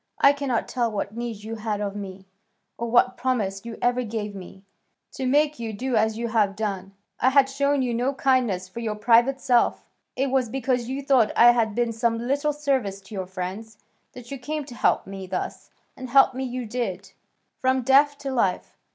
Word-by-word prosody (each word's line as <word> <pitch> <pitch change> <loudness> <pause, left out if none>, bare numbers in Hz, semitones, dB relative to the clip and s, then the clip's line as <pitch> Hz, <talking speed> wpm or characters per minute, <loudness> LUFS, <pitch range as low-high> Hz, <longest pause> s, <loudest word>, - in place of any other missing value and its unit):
I 280 - +6
cannot 280 -4 -2
tell 240 -3 -1
what 205 0 -4
need 230 -3 -5
you 225 +1 -6
had 215 -1 -3
of 205 -1 -3
me, 195 -2 -8 0.5
or 235 - -4
what 245 +1 +3
promise 210 -7 -1
you 230 -1 -7
ever 245 +1 +2
gave 215 -3 -4
me, 190 0 -11 0.5
to 265 - -3
make 295 +2 +2
you 225 -2 -4
do 250 +4 -2
as 220 0 +2
you 235 0 -3
have 210 -3 +1
done. 195 -2 -4 0.2
I 260 - +4
had 270 0 +5
shown 280 0 +1
you 245 -2 -1
no 250 +4 0
kindness 245 -10 +1
for 185 +5 -8
your 220 -2 -2
private 235 +5 +3
self: 250 -4 +2 0.3
it 270 0 0
was 260 -3 +1
because 250 -1 -1
you 275 +2 -3
thought 260 -6 +3
I 240 +1 +8
had 225 -3 0
been 240 -1 +1
of - - -4
some 230 0 0
little 280 +6 0
service 270 -9 -1
to 205 - -14
your 190 -2 -4
friends, 190 +4 -6 0.4
that 250 -1 -12
you 275 - -5
came 300 +3 -4
to 250 - -10
help - - +1
me 195 -1 -8
thus, - - -5 0.3
and 255 -1 -8
help 270 +1 +5
me 260 +1 -3
you 250 -1 -4
did, 210 -5 -4 0.5
from 260 0 +1
death 280 +3 +4
to 275 - -3
life. 200 -8 -1
235 Hz, 205 wpm, -24 LUFS, 210-265 Hz, 0.5 s, I